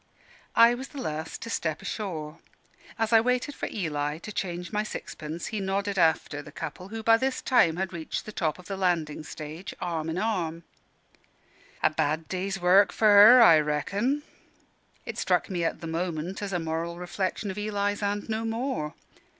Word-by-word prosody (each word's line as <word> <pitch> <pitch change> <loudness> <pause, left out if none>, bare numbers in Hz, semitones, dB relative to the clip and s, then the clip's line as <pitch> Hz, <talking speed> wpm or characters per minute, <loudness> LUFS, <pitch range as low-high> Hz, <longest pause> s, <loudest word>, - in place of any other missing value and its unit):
I 235 +1 +7
was 260 +2 -5
the 285 - -12
last 160 -8 -4
to 230 - -6
step 160 -6 -1
ashore. 165 -7 -5 0.6
As 225 0 0
I 225 - +8
waited 250 +4 0
for - - -4
Eli 150 -6 -2
to 195 +6 -8
change 180 -3 -4
my 210 - +1
sixpence, 165 -6 -6
he 215 - -1
nodded 195 0 -1
after 160 -3 +2
the 155 - -12
couple, 165 +5 -7
who 220 +2 -6
by 225 0 +6
this 265 +2 -1
time 170 -11 +3
had 190 +1 -3
reached 160 -2 -4
the 215 - -7
top 160 -7 -1
of 180 - -14
the 195 - -4
landing 170 -5 0
stage, 155 +4 -8
arm 165 -2 -2
in 160 - -3
arm. 175 -6 -1 1.2
"A - - +5
bad 155 +1 -1
day's 190 +1 -3
work 185 +3 +5
for 215 - +3
her, 215 +5 +9
I 165 -7 +8
reckon." 200 - 0 0.8
It - - -5
struck - - +1
me 175 -2 -1
at 165 - -2
the - - -6
moment 165 +2 -3
as 200 -1 -3
a 180 - 0
moral 165 +1 -3
reflection 185 +3 -3
of 200 - -6
Eli's, 205 -1 -1
and 205 0 -1
no 220 0 -2
more. 225 - -2
185 Hz, 185 wpm, -27 LUFS, 160-210 Hz, 1.2 s, her